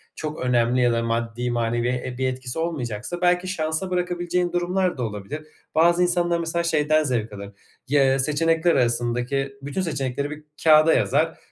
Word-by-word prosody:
çok 155 Hz, -1 st, -5 dB
önemli 125 Hz, 0 st, +2 dB
ya 120 Hz, -1 st, +3 dB
da 115 Hz, 0 st, 0 dB
maddi 115 Hz, +1 st, -2 dB
manevi 120 Hz, 0 st, 0 dB, 0.2 s
e 125 Hz, -, -5 dB
bir 130 Hz, 0 st, 0 dB
etkisi 130 Hz, +3 st, -4 dB
olmayacaksa 155 Hz, 0 st, -3 dB
belki 180 Hz, +1 st, +2 dB
şansa 160 Hz, 0 st, -2 dB
bırakabileceğin 180 Hz, 0 st, -1 dB
durumlar 180 Hz, -1 st, 0 dB
da 125 Hz, -, -2 dB
olabilir. 115 Hz, +9 st, -6 dB, 0.3 s
Bazı 170 Hz, +2 st, +4 dB
insanlar 175 Hz, -1 st, +1 dB
mesela 170 Hz, +1 st, -1 dB
şeyden 155 Hz, -1 st, +2 dB
zevk 115 Hz, -6 st, -2 dB
alır; 100 Hz, 0 st, -8 dB, 0.4 s
y 145 Hz, +2 st, +3 dB
eee, 135 Hz, 0 st, +2 dB
seçenekler 165 Hz, +4 st, +2 dB
arasındaki 120 Hz, +3 st, 0 dB
bütün 140 Hz, +7 st, -3 dB
seçenekleri 140 Hz, -4 st, -2 dB
bir 150 Hz, 0 st, -8 dB, 0.2 s
kağıda 155 Hz, 0 st, +6 dB
yazar. 155 Hz, +5 st, +1 dB
150 Hz, 160 wpm, -23 LUFS, 125-170 Hz, 0.4 s, kağıda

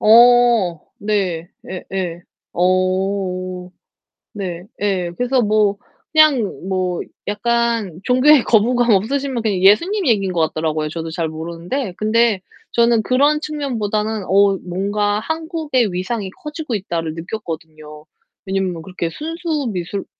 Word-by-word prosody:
어 235 Hz, -6 st, +5 dB, 0.2 s
네. 190 Hz, -5 st, -1 dB, 0.2 s
예예. 180 Hz, -2 st, -4 dB, 0.3 s
어. 185 Hz, 0 st, 0 dB, 0.6 s
네. 180 Hz, -4 st, -5 dB, 0.2 s
예. 185 Hz, -4 st, 0 dB
그래서 250 Hz, +1 st, +2 dB
뭐 210 Hz, -2 st, +2 dB, 0.4 s
그냥 275 Hz, -, +3 dB
뭐 185 Hz, -2 st, -1 dB, 0.3 s
약간 230 Hz, -3 st, 0 dB
종교에 260 Hz, +3 st, +5 dB
거부감 240 Hz, +2 st, +3 dB
없으시면 255 Hz, +5 st, +1 dB
그냥 205 Hz, -4 st, 0 dB
예수님 340 Hz, -, +4 dB
얘기인 195 Hz, -5 st, +2 dB
것 170 Hz, -, +1 dB
같더라고요, 155 Hz, -1 st, -2 dB
저도 165 Hz, +1 st, -5 dB
잘 165 Hz, 0 st, -2 dB
모르는데. 170 Hz, -, -4 dB
근데 215 Hz, -2 st, +2 dB, 0.3 s
저는 235 Hz, -1 st, +3 dB
그런 285 Hz, +5 st, +3 dB
측면보다는 220 Hz, -8 st, -2 dB
'어 200 Hz, +1 st, +4 dB
뭔가 205 Hz, +3 st, -1 dB
한국의 315 Hz, -, -1 dB
위상이 190 Hz, +3 st, -3 dB
커지고 300 Hz, -3 st, -5 dB
있다.'를 170 Hz, -5 st, -3 dB
느꼈거든요. 160 Hz, -4 st, -7 dB, 0.4 s
왜냐하면 190 Hz, -3 st, -2 dB
그렇게 175 Hz, -1 st, -4 dB
순수 315 Hz, -, -3 dB
미술 185 Hz, +1 st, -4 dB
205 Hz, 265 characters per minute, -19 LUFS, 180-240 Hz, 0.6 s, 어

